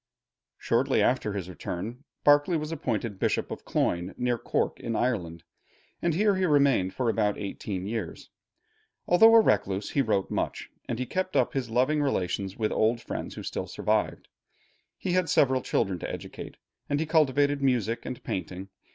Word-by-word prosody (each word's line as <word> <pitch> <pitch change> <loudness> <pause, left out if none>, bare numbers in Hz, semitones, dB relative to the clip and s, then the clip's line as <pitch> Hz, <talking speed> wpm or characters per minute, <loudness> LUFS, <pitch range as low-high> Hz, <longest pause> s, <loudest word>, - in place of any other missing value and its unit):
Shortly - - +1
after 105 - +1
his 95 -3 -4
return, 105 - -6 0.2
Berkeley 145 +4 +5
was 155 +1 -4
appointed 115 -9 -3
Bishop - - 0
of - - -7
Cloyne, 90 +2 -1
near 125 -1 0
Cork - - -1
in 115 - -3
Ireland, 90 -9 -1 0.6
and 170 -2 +1
here 205 +1 +3
he 185 - +1
remained 140 - +3
for 125 - -1
about 105 -2 +1
eighteen 100 -1 -5
years. 110 -4 -5 0.8
Although 225 +6 +7
a - - +10
recluse, 100 - 0
he 140 - +2
wrote 105 -6 0
much, - - -3 0.2
and 120 - -1
he 130 - -2
kept 185 +4 -3
up 130 -3 +2
his 130 -4 -2
loving 130 +6 +2
relations 95 -7 -1
with 110 -2 0
old 115 +2 +2
friends - - -6
who - - -7
still - - -4
survived. - - -1 0.7
He 185 - -3
had 180 -2 +1
several 130 -3 +3
children 95 -6 -1
to - - -5
educate, - - -8 0.3
and 145 - +1
he 160 - 0
cultivated 145 -2 +2
music 120 -4 +1
and 125 - -7
painting. 95 +1 -5
120 Hz, 170 wpm, -27 LUFS, 100-145 Hz, 0.8 s, a